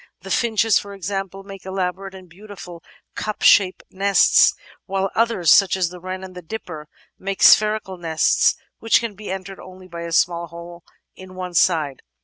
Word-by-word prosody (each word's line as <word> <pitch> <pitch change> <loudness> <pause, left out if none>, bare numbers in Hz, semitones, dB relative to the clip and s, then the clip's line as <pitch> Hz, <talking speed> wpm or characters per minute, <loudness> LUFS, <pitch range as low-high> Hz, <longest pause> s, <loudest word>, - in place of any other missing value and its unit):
The - - -9
Finches, 225 -2 +2
for 200 0 -10
example, 195 0 -5
make 195 -1 -11
elaborate 190 0 -4
and 185 -1 -13
beautiful 180 -2 -12 0.3
cup 215 -1 -5
shaped 190 -3 +4
nests, 200 +1 +4 0.3
while 195 0 -2
others, 225 -8 +2
such 195 -1 +5
as 180 -3 0
the 180 0 -11
Wren 185 +1 -6
and 190 -1 -10
the 180 - -9
Dipper, 160 -4 -8 0.3
make 195 0 -3
spherical 210 -3 +4
nests 160 -2 +2 0.2
which 225 - +3
can 230 -2 -5
be 210 +2 -10
entered 190 0 -6
only 185 0 -13
by 170 -1 -8
a 170 0 -6
small 170 +1 +1
hole 170 +1 -11 0.3
in 185 0 -13
one 180 -1 -6
side. 155 -5 +1
185 Hz, 170 wpm, -21 LUFS, 175-195 Hz, 0.3 s, such